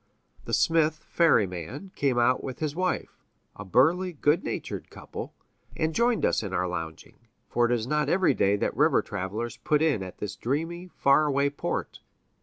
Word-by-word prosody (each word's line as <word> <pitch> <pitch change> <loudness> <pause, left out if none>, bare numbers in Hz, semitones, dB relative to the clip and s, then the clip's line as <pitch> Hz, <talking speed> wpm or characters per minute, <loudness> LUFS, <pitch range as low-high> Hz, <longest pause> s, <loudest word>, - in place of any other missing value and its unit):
The - - -6
smith 160 -1 +3
ferryman 135 - 0
came 135 -3 +1
out 120 +1 +3
with 130 -2 -5
his 155 -2 -3
wife 185 +1 -2 0.4
a 105 - -8
burly, 165 - +2
good 150 +1 +2
natured - - -5
couple - - -8 0.4
and 160 0 0
joined 235 +4 +2
us - - +2
in 100 -3 -5
our 90 +1 0
lounging, 80 -3 -6 0.3
for 120 0 +2
it - - -2
is 115 -2 0
not 150 +3 0
every 185 +1 +3
day 100 +1 +2
that 100 - -1
river - - +3
travelers 110 +5 -4
put 150 -1 +1
in 150 -11 +2
at 95 -1 -8
this 105 -1 -5
dreamy, 165 - -3
far 150 -2 +3
away 140 0 +1
port. 145 - -4
140 Hz, 175 wpm, -27 LUFS, 105-160 Hz, 0.4 s, smith